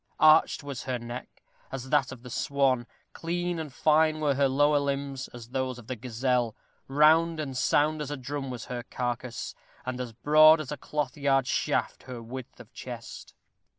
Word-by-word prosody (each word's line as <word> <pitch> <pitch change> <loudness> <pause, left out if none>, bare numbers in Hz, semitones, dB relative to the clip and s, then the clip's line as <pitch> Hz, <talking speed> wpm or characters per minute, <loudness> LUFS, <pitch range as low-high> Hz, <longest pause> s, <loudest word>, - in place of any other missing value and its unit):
Arched 155 -1 +5
was 140 -3 -6
her 130 -1 -1
neck, 120 +1 -9 0.3
as 130 -1 -6
that 140 -3 +3
of 125 -2 -10
the 125 - -9
swan; 130 -2 +1 0.3
clean 175 +1 -2
and 155 -3 -5
fine 155 +3 +3
were 150 -2 +2
her 140 +1 +3
lower 145 +2 +3
limbs, 140 -1 -3
as 120 -1 -11
those 130 -1 -2
of 120 - -12
the 130 - -4
gazelle; 120 0 -1 0.3
round 155 +4 +4
and 135 -4 -4
sound 150 +4 +2
as 145 - -4
a 145 - -3
drum 135 +1 -4
was 125 -2 -6
her 125 -1 -4
carcase, 120 0 -4 0.3
and 125 0 -3
as 125 -2 -5
broad 155 +6 +6
as 150 -3 -5
a 150 - -3
cloth 145 -1 -3
yard 135 -2 +2
shaft - - -1
her 125 -2 -5
width 120 +2 -9
of - - -14
chest. - - -9
135 Hz, 185 wpm, -28 LUFS, 125-150 Hz, 0.3 s, broad